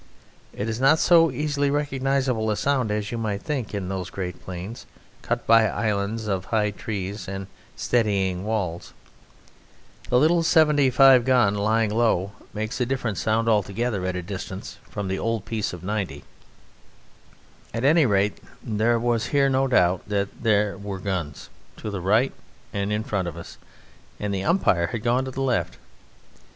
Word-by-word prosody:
It 105 Hz, -, -4 dB
is 115 Hz, +1 st, -3 dB
not 135 Hz, +4 st, +5 dB
so 165 Hz, 0 st, +5 dB
easily 145 Hz, +1 st, -1 dB
recognizable 135 Hz, -5 st, 0 dB
a 105 Hz, -, 0 dB
sound 135 Hz, -5 st, +1 dB
as 105 Hz, 0 st, -2 dB
you 120 Hz, -, -3 dB
might 105 Hz, -3 st, -3 dB
think 135 Hz, -8 st, -3 dB
in 100 Hz, -3 st, -3 dB
those 95 Hz, -1 st, -4 dB
great 90 Hz, -2 st, -5 dB
plains 95 Hz, +5 st, -7 dB, 0.3 s
cut 120 Hz, 0 st, -2 dB
by 115 Hz, -1 st, +6 dB
islands 105 Hz, +1 st, -1 dB
of 95 Hz, -3 st, -1 dB
high 105 Hz, -1 st, +1 dB
trees 100 Hz, -1 st, -5 dB
and 95 Hz, 0 st, -5 dB, 0.3 s
steading 100 Hz, -6 st, 0 dB
walls. 100 Hz, -6 st, -3 dB, 1.1 s
The 125 Hz, -, +4 dB
little 165 Hz, +5 st, +4 dB
"75" 135 Hz, -6 st, +5 dB
gun 120 Hz, -5 st, +3 dB
lying 105 Hz, +1 st, +1 dB
low 105 Hz, -4 st, +1 dB, 0.2 s
makes 110 Hz, +4 st, -4 dB
a -, -, +3 dB
different 120 Hz, -6 st, -2 dB
sound 110 Hz, +1 st, +1 dB
altogether 105 Hz, 0 st, 0 dB
at 95 Hz, -, -2 dB
a 90 Hz, -, -3 dB
distance 95 Hz, +1 st, -7 dB
from 100 Hz, -2 st, -4 dB
the 95 Hz, 0 st, -2 dB
old 115 Hz, -3 st, -2 dB
piece 110 Hz, -2 st, -2 dB
of 90 Hz, -1 st, -9 dB
"90." 100 Hz, -1 st, -3 dB, 1.5 s
At 115 Hz, +2 st, -3 dB
any 150 Hz, +1 st, +5 dB
rate 100 Hz, -1 st, +1 dB, 0.2 s
there 115 Hz, +2 st, +1 dB
was 115 Hz, -1 st, 0 dB
here 140 Hz, -1 st, +3 dB
no 135 Hz, 0 st, +2 dB
doubt 90 Hz, -6 st, +2 dB
that 100 Hz, -1 st, -2 dB
there 105 Hz, -3 st, +1 dB
were 100 Hz, -1 st, -5 dB
guns 90 Hz, -6 st, -4 dB, 0.3 s
to 105 Hz, -, -5 dB
the 100 Hz, -3 st, -4 dB
right 110 Hz, +8 st, +2 dB, 0.4 s
and 100 Hz, 0 st, -2 dB
in 105 Hz, +1 st, 0 dB
front 100 Hz, -5 st, -2 dB
of 85 Hz, -1 st, -6 dB
us, 85 Hz, -, -10 dB, 0.6 s
and 105 Hz, -1 st, -2 dB
the 95 Hz, 0 st, -2 dB
umpire 95 Hz, -, +2 dB
had 110 Hz, +4 st, -5 dB
gone 125 Hz, +2 st, +1 dB
to -, -, -4 dB
the 135 Hz, +1 st, -3 dB
left. 130 Hz, -3 st, -1 dB
110 Hz, 165 wpm, -24 LUFS, 100-125 Hz, 1.5 s, by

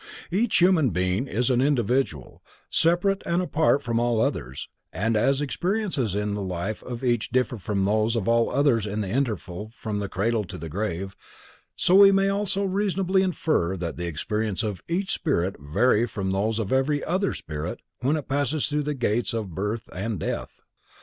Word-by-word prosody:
Each 210 Hz, +5 st, +2 dB
human 175 Hz, -6 st, +4 dB
being 90 Hz, +6 st, 0 dB
is 125 Hz, +3 st, 0 dB
an 125 Hz, 0 st, +3 dB
individual, 125 Hz, -, 0 dB, 0.3 s
separate 175 Hz, +4 st, +2 dB
and 170 Hz, +1 st, 0 dB
apart 160 Hz, -5 st, +2 dB
from 115 Hz, -1 st, 0 dB
all 120 Hz, -1 st, +1 dB
others, 65 Hz, -, -2 dB, 0.2 s
and 110 Hz, +6 st, 0 dB
as 135 Hz, +6 st, +2 dB
experiences 170 Hz, -, -1 dB
in 105 Hz, 0 st, -1 dB
the 105 Hz, -, -3 dB
life 95 Hz, +2 st, -3 dB
of 125 Hz, 0 st, -7 dB
each 120 Hz, -3 st, +1 dB
differ 125 Hz, -2 st, 0 dB
from 100 Hz, 0 st, -1 dB
those 110 Hz, +3 st, +2 dB
of 110 Hz, -5 st, -1 dB
all 115 Hz, 0 st, +3 dB
others 125 Hz, -7 st, +2 dB
in 105 Hz, +1 st, -2 dB
the 100 Hz, -, -3 dB
interval 110 Hz, -5 st, -2 dB
from 105 Hz, -2 st, -3 dB
the 100 Hz, -1 st, -3 dB
cradle 110 Hz, +3 st, 0 dB
to -, -, -8 dB
the 80 Hz, +1 st, -7 dB
grave, 95 Hz, +1 st, -3 dB, 0.6 s
so 180 Hz, -, +2 dB
we 195 Hz, +1 st, +9 dB
may 195 Hz, 0 st, +3 dB
also 200 Hz, 0 st, 0 dB
reasonably 195 Hz, -1 st, +1 dB
infer 155 Hz, -, 0 dB
that 85 Hz, -2 st, -4 dB
the 85 Hz, 0 st, -3 dB
experiences 105 Hz, +6 st, -2 dB
of 105 Hz, -4 st, -3 dB
each 185 Hz, +3 st, -1 dB
spirit 95 Hz, -, 0 dB
vary 105 Hz, -, +2 dB
from 95 Hz, -3 st, -3 dB
those 105 Hz, +3 st, 0 dB
of 110 Hz, 0 st, -1 dB
every 145 Hz, +2 st, +1 dB
other 190 Hz, +3 st, 0 dB
spirit 75 Hz, +3 st, -5 dB, 0.2 s
when 135 Hz, +5 st, +1 dB
it 150 Hz, -, -6 dB
passes 145 Hz, +2 st, 0 dB
through 150 Hz, 0 st, 0 dB
the 150 Hz, 0 st, -2 dB
gates 120 Hz, -1 st, 0 dB
of 105 Hz, -6 st, -4 dB
birth 105 Hz, +5 st, -3 dB
and 100 Hz, +1 st, -3 dB
death. -, -, -4 dB
115 Hz, 185 wpm, -25 LUFS, 100-150 Hz, 0.6 s, we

